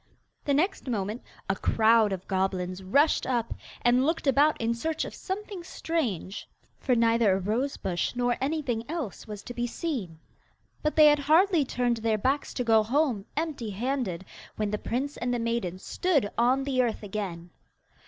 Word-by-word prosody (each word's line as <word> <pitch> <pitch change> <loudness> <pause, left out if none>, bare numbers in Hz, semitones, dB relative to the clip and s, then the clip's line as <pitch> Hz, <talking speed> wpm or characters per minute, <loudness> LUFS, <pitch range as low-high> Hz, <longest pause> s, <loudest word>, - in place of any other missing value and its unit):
The 285 - +2
next 345 +1 0
moment 215 -1 -2 0.3
a - - +1
crowd 220 -1 +4
of 190 -1 -5
goblins 185 -1 -1
rushed 280 +12 +2
up, 240 -3 0 0.3
and 245 +1 +4
looked 320 +3 0
about 285 +3 +4
in 230 0 +1
search 315 +7 -2
of - - -7
something 395 -1 -5
strange, 250 - -3 0.3
for 255 - +1
neither 230 -3 +4
a 190 - +1
rose 230 +9 -1
bush 175 +5 -2
nor 245 0 +1
anything 270 -5 -1
else 305 - -5
was 210 -1 -7
to 245 - -7
be 240 0 -2
seen. 235 - -4 0.6
But 305 - 0
they 310 - +8
had 295 0 +6
hardly 320 +3 +4
turned 245 -2 0
their 225 -1 +1
backs 270 +7 0
to 250 - 0
go 225 -2 +5
home 240 -3 0
empty 300 -8 -2
handed 210 -4 -2 0.3
when 210 -1 -1
the 210 - -1
prince 270 +4 -3
and 245 +1 -2
the 245 - +1
maiden 230 -6 -2
stood 285 - 0
on 255 +3 +3
the 265 -2 +1
earth 230 -3 -1
again. 190 -4 -5
240 Hz, 175 wpm, -28 LUFS, 210-285 Hz, 0.6 s, they